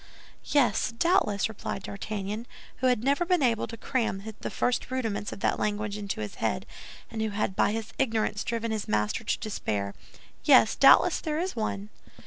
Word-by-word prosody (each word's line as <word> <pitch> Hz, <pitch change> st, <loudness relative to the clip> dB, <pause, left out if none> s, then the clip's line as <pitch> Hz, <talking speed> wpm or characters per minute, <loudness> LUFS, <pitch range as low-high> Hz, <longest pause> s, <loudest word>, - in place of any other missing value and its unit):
"Yes, 285 Hz, -5 st, +2 dB
doubtless," 230 Hz, -, +2 dB
replied 200 Hz, -2 st, -5 dB
D'Artagnan, 210 Hz, +3 st, -5 dB, 0.3 s
who 260 Hz, -, +1 dB
had 245 Hz, -3 st, +2 dB
never 280 Hz, +6 st, +2 dB
been 350 Hz, -3 st, +2 dB
able 230 Hz, -3 st, +2 dB
to 230 Hz, -, -8 dB
cram 225 Hz, -5 st, -1 dB, 0.2 s
the -, -, -4 dB
first 245 Hz, -, 0 dB
rudiments 225 Hz, -6 st, -2 dB
of -, -, -8 dB
that -, -, +1 dB
language 210 Hz, -1 st, -1 dB
into 200 Hz, -, -4 dB
his 105 Hz, -, -5 dB
head, 65 Hz, -, 0 dB, 0.5 s
and 225 Hz, -1 st, -3 dB
who 220 Hz, -, 0 dB
had 200 Hz, -2 st, -1 dB
by -, -, +3 dB
his 225 Hz, 0 st, -4 dB
ignorance 220 Hz, -5 st, 0 dB
driven 230 Hz, -1 st, -2 dB
his 220 Hz, -2 st, -2 dB
master 105 Hz, 0 st, 0 dB
to -, -, 0 dB
despair, 105 Hz, -, -3 dB, 0.5 s
"yes, -, -, +6 dB
doubtless -, -, +6 dB
there 310 Hz, -2 st, -2 dB
is 365 Hz, +3 st, -2 dB
one." 215 Hz, -2 st, -3 dB
220 Hz, 175 wpm, -28 LUFS, 200-245 Hz, 0.5 s, yes